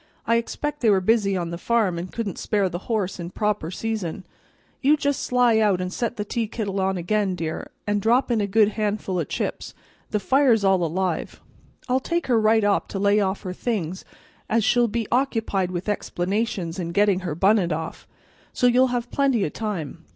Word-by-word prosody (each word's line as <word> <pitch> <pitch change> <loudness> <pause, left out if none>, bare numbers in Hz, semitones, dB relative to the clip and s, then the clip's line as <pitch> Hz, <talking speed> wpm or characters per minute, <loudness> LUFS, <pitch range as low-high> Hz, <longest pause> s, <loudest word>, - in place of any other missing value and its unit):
I 230 - +3
expect 295 +5 -3
they 230 - +4
were 195 -2 +5
busy 200 0 +2
on 170 -1 -3
the 170 - -5
farm, 210 -5 +1
and 175 +1 -6
couldn't 215 -6 -4
spare 200 -3 +1
the 175 - -4
horse 200 -5 -1
in 170 0 -5
proper 210 -3 -1
season. 190 -3 -4 0.6
You 290 +3 +4
just 285 -1 0
sly 245 -3 +3
out 205 -4 +3
an' 180 0 -3
set 235 +3 -2
the 210 - -2
teakittle 210 -3 -2
on 190 0 0
again, 195 +2 0
dear, 160 -2 -4 0.2
an' 205 0 +1
drop 240 +5 +2
in 225 -3 +2
a 200 - 0
good 210 +1 +4
han'ful 210 -3 -2
o' - - +1
chips; - - -4 0.3
the 210 - 0
fire's 250 -1 +3
all 190 -2 +3
alive. 175 +1 -2 0.5
I'll 255 +1 +2
take 340 +5 -2
her 235 -3 +2
right 220 0 +4
up 205 -1 +2
to - - -5
lay 200 +1 +3
off 195 0 -1
her 185 -2 -4
things, 185 -5 -3 0.5
as 225 0 +2
she'll 240 +2 +3
be 225 0 -2
occupied 225 -7 0
with 180 +1 -4
explanations 195 -2 -2
an' 170 -1 -4
gettin' 200 -1 +3
her 175 -5 -4
bunnit 190 0 +3
off, 160 +1 -5 0.4
so - - 0
you'll 250 +1 +5
have 245 -1 -3
plenty 270 -7 +2
o' - - -2
time. 170 -6 -5
205 Hz, 195 wpm, -24 LUFS, 185-230 Hz, 0.6 s, were